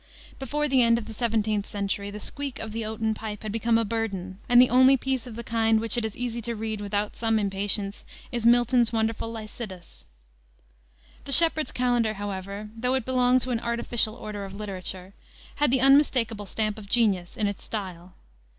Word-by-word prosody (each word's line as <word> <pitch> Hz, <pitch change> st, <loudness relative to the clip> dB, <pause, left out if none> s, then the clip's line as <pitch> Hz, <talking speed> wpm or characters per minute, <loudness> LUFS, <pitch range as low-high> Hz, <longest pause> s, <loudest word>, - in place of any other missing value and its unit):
Before 295 Hz, +3 st, -1 dB
the 265 Hz, -2 st, +3 dB
end 230 Hz, -1 st, +5 dB
of 230 Hz, -, -5 dB
the -, -, -8 dB
17th 215 Hz, -2 st, 0 dB
century 200 Hz, 0 st, -3 dB
the 205 Hz, +1 st, -7 dB
squeak 280 Hz, +4 st, -4 dB
of 220 Hz, -, -5 dB
the 225 Hz, +1 st, -3 dB
oaten 220 Hz, 0 st, -1 dB
pipe 215 Hz, -1 st, -7 dB
had 215 Hz, -, -4 dB
become 225 Hz, +1 st, +2 dB
a 230 Hz, -, +1 dB
burden, 195 Hz, -4 st, -3 dB
and 245 Hz, 0 st, +7 dB
the 250 Hz, -, +6 dB
only 260 Hz, +2 st, +6 dB
piece 260 Hz, -1 st, -2 dB
of 230 Hz, -, -8 dB
the 235 Hz, -, -6 dB
kind 225 Hz, -1 st, +2 dB
which 225 Hz, -1 st, 0 dB
it 240 Hz, -, 0 dB
is 220 Hz, -1 st, -4 dB
easy 235 Hz, -1 st, -3 dB
to 235 Hz, +1 st, -4 dB
read 220 Hz, -1 st, -4 dB
without 205 Hz, 0 st, -2 dB
some 225 Hz, -1 st, +1 dB
impatience 200 Hz, 0 st, -1 dB, 0.3 s
is 240 Hz, -2 st, -2 dB
Milton's 240 Hz, 0 st, +4 dB
wonderful 225 Hz, 0 st, -1 dB
Lycidas. 215 Hz, -5 st, -9 dB, 1.2 s
The 280 Hz, -, -4 dB
Shepheard's 320 Hz, 0 st, +4 dB
Calendar, 240 Hz, -3 st, +1 dB
however, 200 Hz, +1 st, -5 dB
though 250 Hz, +3 st, 0 dB
it 260 Hz, -4 st, -1 dB
belonged 255 Hz, 0 st, +3 dB
to 255 Hz, -, -3 dB
an 235 Hz, -, 0 dB
artificial 235 Hz, -1 st, -1 dB
order 210 Hz, -4 st, -6 dB
of 195 Hz, 0 st, -8 dB
literature, 190 Hz, -2 st, -5 dB, 0.4 s
had 295 Hz, -1 st, +3 dB
the 260 Hz, 0 st, +2 dB
unmistakable 255 Hz, -6 st, +3 dB
stamp 215 Hz, +1 st, -2 dB
of 200 Hz, -2 st, -12 dB
genius 200 Hz, -7 st, +1 dB
in 215 Hz, -, 0 dB
its 200 Hz, -1 st, -3 dB
style. 185 Hz, -4 st, -6 dB
225 Hz, 190 wpm, -26 LUFS, 205-240 Hz, 1.2 s, and